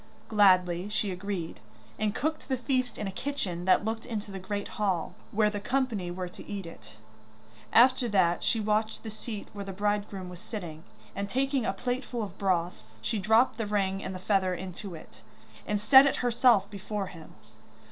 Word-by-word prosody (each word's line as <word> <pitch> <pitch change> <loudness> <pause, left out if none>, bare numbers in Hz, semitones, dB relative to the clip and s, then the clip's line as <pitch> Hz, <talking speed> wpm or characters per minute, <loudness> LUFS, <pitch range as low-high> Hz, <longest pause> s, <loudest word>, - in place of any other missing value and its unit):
Gladly 185 -3 +4
she 210 -1 -1
agreed, 180 - -4 0.4
and 215 0 0
cooked 310 +2 -2
the 260 - 0
feast 255 0 -1
in 210 - -3
a 195 - -3
kitchen 190 -7 -3
that 190 +2 +4
looked 225 0 -2
into 215 -3 -5
the 195 - -5
great 200 +2 -3
hall, 190 -6 -1 0.2
where 210 0 +2
the 205 - -3
company 230 -5 -1
were 180 +1 -4
to 175 - -11
eat 200 -3 -5
it. 110 -9 -12 0.7
After 250 +1 +5
that 180 -4 +2
she 225 - +1
watched 215 +1 0
the 220 - -5
seat 215 -1 -7
where 200 -1 -5
the 195 -1 -6
bridegroom 205 -1 -1
was 180 -1 -9
sitting, 175 -7 -7 0.3
and 200 0 -3
taking 270 0 0
a - - +2
plateful 245 +1 -3
of 200 - -5
the 190 - -22
broth, 180 -2 0 0.2
she 220 - -1
dropped 220 +6 +3
the 220 - -1
ring 195 -1 0
and 190 - -4
the - - -3
feather 185 -1 +1
into 185 +1 -7
it, 110 -8 -13 0.5
and 210 - 0
set 265 +6 +8
if 275 - +1
herself 240 -3 +4
before 205 0 -4
him. 165 -4 -12
205 Hz, 190 wpm, -29 LUFS, 185-225 Hz, 0.7 s, set